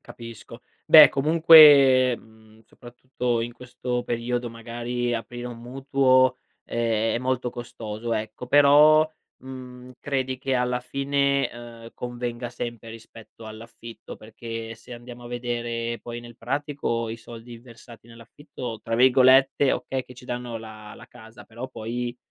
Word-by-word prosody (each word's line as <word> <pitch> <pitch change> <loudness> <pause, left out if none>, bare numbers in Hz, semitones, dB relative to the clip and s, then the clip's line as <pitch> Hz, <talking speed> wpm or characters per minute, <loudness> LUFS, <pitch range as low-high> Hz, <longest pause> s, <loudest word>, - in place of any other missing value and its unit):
Capisco. 115 0 -12 0.2
Beh 155 -1 +9
comunque, 140 -4 +6
mhmm, 110 -1 -21
soprattutto 125 -1 -4
in 120 +1 -4
questo 125 0 -5
periodo 120 0 -3
magari 120 +1 -4
aprire 120 +1 -6
un 120 -1 -8
mutuo 130 0 +2 0.3
è 115 -1 -1
molto 125 0 -2
costoso, 115 -1 -7
ecco. 110 +2 -5
Però, 145 +3 +5 0.3
mhmm, 125 -1 -11
credi 130 -2 -3
che 135 0 -2
alla 125 0 -1
fine, 140 +1 -1
ehm, 115 -1 -12
convenga 120 0 -6
sempre 120 -2 -7
rispetto 115 0 -14
all'affitto? 115 0 -11
Perché 115 +1 -8
se 120 +2 -14
andiamo 120 0 -11
a - - -9
vedere 120 -1 -4
poi 120 0 -8
nel 120 -1 -13
pratico 140 -6 -3
i 110 - -5
soldi 115 0 -12
versati 115 -1 -16
nell'affitto, 115 +1 -10
tra 115 - -3
virgolette, 130 +2 +4
okay, 130 -1 -3
che 125 - -14
"ci 125 +1 -15
danno 120 -1 -5
la 110 -1 -11
la - - -14
casa" 110 -2 -15
però 120 +3 -9
poi, 120 +2 -5
120 Hz, 135 wpm, -24 LUFS, 115-130 Hz, 0.3 s, Beh